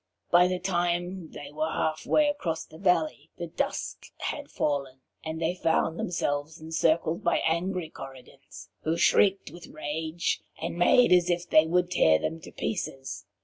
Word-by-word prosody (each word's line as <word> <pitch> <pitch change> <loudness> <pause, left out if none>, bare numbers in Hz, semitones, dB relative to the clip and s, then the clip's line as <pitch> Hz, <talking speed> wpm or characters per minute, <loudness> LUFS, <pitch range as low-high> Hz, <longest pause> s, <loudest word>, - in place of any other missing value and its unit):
By 175 +1 +6
the 185 0 -1
time 175 -1 -1
they 145 0 -9
were 155 +1 -1
half 155 -1 -2
way 305 -1 +4
across 175 - -2
the 160 - -14
valley, 165 -5 +1
the 175 - -4
dusk 165 - -3
had - - -4
fallen, 140 -3 -2 0.2
and 160 0 -4
they 165 +1 0
found 165 -2 0
themselves 150 -2 -2
encircled 160 +1 +1
by 170 - +3
angry 170 0 -1
Korrigans, 130 -2 -12
who 160 +1 0
shrieked 195 -1 +3
with 175 +1 -11
rage 155 +2 -2 0.2
and - - -3
made 180 +8 +5
as 180 -1 +5
if 175 0 0
they 155 +1 +5
would 180 +1 +1
tear 80 - +5
them 165 - -3
to 165 - -11
pieces. 135 - -4
165 Hz, 160 wpm, -28 LUFS, 155-175 Hz, 0.2 s, By